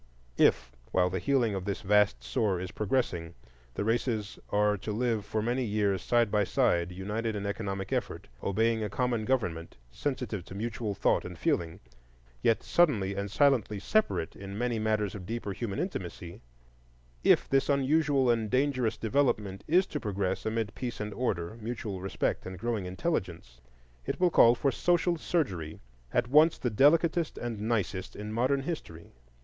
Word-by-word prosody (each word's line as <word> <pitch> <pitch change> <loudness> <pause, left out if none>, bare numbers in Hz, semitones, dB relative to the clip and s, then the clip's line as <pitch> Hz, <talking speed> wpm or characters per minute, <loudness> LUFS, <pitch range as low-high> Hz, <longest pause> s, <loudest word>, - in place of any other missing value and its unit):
If, - - +4 0.2
while 90 -1 +2
the 95 - -1
healing 120 +2 +1
of 95 -2 -3
this 100 -1 -3
vast 105 -11 +3
sore 90 - 0
is 90 0 -5
progressing, 95 -7 -1 0.4
the - - -1
races 110 -1 -1
are 105 0 +2
to 105 - -5
live 115 -1 0
for 110 -1 -2
many 125 +3 0
years 105 -4 0
side 120 -3 +2
by 105 -1 +3
side, 85 -2 +1
united 105 +5 -3
in 100 -1 -4
economic 100 -2 -3
effort, - - -3
obeying 110 +3 +1
a 105 - -2
common 120 +1 -1
government, 90 - -1
sensitive 125 - -3
to 95 - -10
mutual 110 -1 -3
thought - - +2
and - - -8
feeling, 80 -1 -1 0.6
yet 115 - +2
subtly 115 - +2
and 100 +1 -3
silently 125 -4 +2
separate 155 - 0
in 100 0 -7
many 120 -1 -1
matters 110 -2 0
of 90 -4 -8
deeper 115 -2 -3
human 100 -2 -4
intimacy,—if - - -3
this 135 +1 +2
unusual 140 -1 +2
and 115 -2 0
dangerous 130 -3 +1
development 110 -6 0
is 180 +4 +4
to 150 - -4
progress 100 -4 -2
amid 110 -1 -1
peace 125 -2 -5
and 105 -1 -4
order, 110 -5 -2
mutual 105 -4 -4
respect 95 0 -2
and 95 0 -7
growing 110 -2 -2
intelligence, 90 - -3 0.5
it - - -2
will 180 -1 +3
call 120 -4 +7
for 140 +2 +1
social 175 +2 +2
surgery 95 - -2 0.3
at 120 -1 +1
once 155 +5 +5
the 125 - -2
delicatest 160 +7 +3
and 115 -3 -4
nicest 105 -4 -2
in 105 +1 -6
modern 130 +4 +1
history. 110 - -6
105 Hz, 160 wpm, -29 LUFS, 95-125 Hz, 0.6 s, call